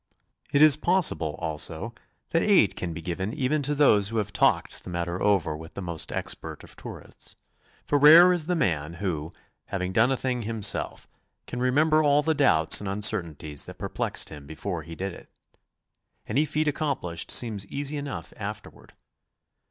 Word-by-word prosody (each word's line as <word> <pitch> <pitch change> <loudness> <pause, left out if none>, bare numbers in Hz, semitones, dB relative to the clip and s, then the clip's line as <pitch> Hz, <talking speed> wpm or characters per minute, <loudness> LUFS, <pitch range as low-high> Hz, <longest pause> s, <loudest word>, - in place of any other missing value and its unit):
It 145 +1 +5
is 155 -2 +6
possible, 160 - 0
also, 80 +6 -3 0.4
that 165 - +1
aid 190 - +4
can 90 - -4
be 80 0 -7
given 95 - -3
even 150 +1 0
to 145 +1 -1
those 105 -9 +4
who 115 - -3
have 105 -1 -2
talked - - +1
the - - -9
matter 85 +1 -3
over 95 -7 +2
with 80 +2 -11
the 100 - -5
most 85 -3 -5
expert - - -3
of - - -14
tourists, - - -9 0.5
for 145 - +1
rare 165 +5 +9
is 165 -3 -2
the 180 - +1
man 80 - -1
who, 85 -4 -3 0.3
having 95 -1 -3
done 115 +6 +4
a 135 - +1
thing 125 -1 -2
himself, 110 -2 -2 0.4
can 125 - -6
remember 155 +5 +3
all 145 0 +3
the 160 +1 +2
doubts 80 - +4
and 100 - -5
uncertainties 85 -8 -1
that - - -10
perplexed - - -3
him 75 -2 -11
before 85 +3 -5
he 80 +1 -10
did 95 +1 -4
it. - - -14 1.0
Any 140 +8 +1
feat 155 +1 -1
accomplished 140 - -2
seems 105 -5 +2
easy 145 +4 -3
enough 140 - -6
after - - -6
ward. - - -19
105 Hz, 175 wpm, -26 LUFS, -, 1.0 s, rare